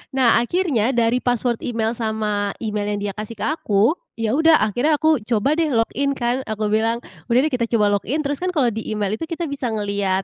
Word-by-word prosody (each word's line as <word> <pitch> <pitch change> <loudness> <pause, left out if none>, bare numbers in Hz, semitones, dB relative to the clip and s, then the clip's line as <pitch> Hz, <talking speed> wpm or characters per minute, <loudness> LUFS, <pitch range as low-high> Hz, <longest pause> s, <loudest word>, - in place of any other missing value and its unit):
Nah 245 -3 +4
akhirnya 260 - 0
dari 235 +1 +2
password 245 -1 0
email 225 -2 -1
sama 215 -3 -1
email 210 -1 -2
yang - - -4
dia - - -14
kasih 215 +2 -6
ke - - -6
aku, 225 -6 +2 0.2
ya 225 -2 -1
udah 320 +2 +5
akhirnya 245 +9 +2
aku 315 -1 +2
coba 240 +6 +1
deh 325 -2 +1
login 275 +5 +1
kan. 250 +1 -1
Aku 215 -1 -2
bilang, 225 +2 +1 0.2
"Udah 235 +1 +3
deh 310 - 0
kita 245 -2 0
coba 205 -2 +3
login," 300 +10 -2
terus 285 -1 -2
kan 365 +1 -1
kalau 270 -7 +2
di 220 0 -5
email 210 -2 -1
itu - - -3
kita 335 -2 -4
bisa 275 -3 -3
ngelihat, 200 -2 -1
235 Hz, 210 wpm, -21 LUFS, 215-280 Hz, 0.2 s, udah